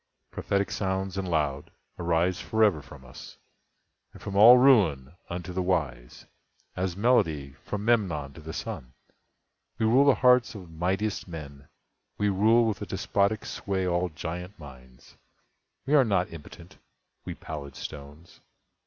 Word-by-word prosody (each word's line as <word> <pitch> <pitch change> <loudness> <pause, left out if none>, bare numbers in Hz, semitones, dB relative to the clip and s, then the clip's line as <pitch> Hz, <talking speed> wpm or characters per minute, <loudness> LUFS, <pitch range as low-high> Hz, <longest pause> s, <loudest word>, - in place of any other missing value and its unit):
Prophetic 100 0 -1
sounds 95 -1 -2
and 95 -1 -3
loud, 75 -4 -1 0.3
arise 85 +2 0
forever 105 -8 +2
From 70 -1 -14
us, 65 - -12 0.8
and - - -13
from 100 - -7
all 115 +5 +9
Ruin, 90 - +4 0.2
unto 90 0 -6
the 95 - -1
wise, 70 -10 -3 0.5
As 90 -1 -3
melody 80 - +1
from 105 0 -5
Memnon 85 -12 0
to 80 - -12
the 80 +1 -8
Sun. 60 -5 -7 0.8
We 110 - 0
rule 125 +6 +4
the 140 - +5
hearts 125 -3 +3
of 90 -5 -10
mightiest 95 +6 -2
men—we 75 +5 -7
rule 110 +5 +3
With 110 -5 -2
a - - -5
despotic 100 +2 -1
sway 95 -2 -3
all 90 0 0
giant 90 +5 -7
minds. 65 -4 -15 0.7
We 140 - -1
are 145 -3 +6
not 100 -7 0
impotent—we 80 -3 -13
pallid 70 -4 -8
stones. 75 +3 -10
90 Hz, 135 wpm, -27 LUFS, 75-105 Hz, 0.8 s, all